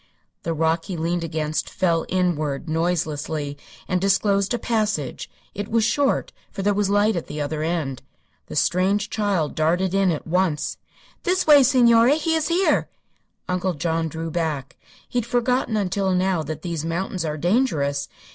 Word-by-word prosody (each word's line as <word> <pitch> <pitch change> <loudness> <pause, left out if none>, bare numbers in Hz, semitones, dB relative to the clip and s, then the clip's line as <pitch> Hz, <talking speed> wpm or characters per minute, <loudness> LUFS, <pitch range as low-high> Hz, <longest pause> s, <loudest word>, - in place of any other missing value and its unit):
The 165 0 -2
rock 165 +1 +1
he 185 -3 -5
leaned 170 +2 -1
against 155 -1 -2
fell 170 -3 0
inward, 160 -5 -1
noiselessly, 155 -3 -1 0.3
and 180 -1 0
disclosed 195 +1 +2
a 240 - +1
passage. 215 - -2 0.2
It 205 +1 -4
was 230 0 +2
short, 275 +5 +1 0.2
for 195 - -5
there 205 +1 +3
was 200 -1 +1
light 205 +2 +3
at 170 - -3
the 150 - -6
other 150 +1 -2
end. 155 -5 -2 0.5
The - - -8
strange 195 +3 +1
child 200 -8 0
darted 175 +4 +1
in 195 -1 +3
at 160 -4 -2
once. 170 -3 0 0.4
"This 365 +1 +1
way, 295 -2 +8
signore. 245 -1 +5
He 320 +1 0
is 320 -1 +1
here!" 355 +3 +2 0.6
Uncle 180 0 -1
John 165 +1 -1
drew 160 +1 -5
back. 155 -5 -2 0.3
He 245 - -1
had 230 - -3
forgotten 245 -1 +1
until 195 -1 0
now 185 -2 +1
that 155 0 -6
these 170 -4 -3
mountains 170 +2 -2
are 155 -1 -3
dangerous. 155 - +1
180 Hz, 165 wpm, -23 LUFS, 160-210 Hz, 0.6 s, way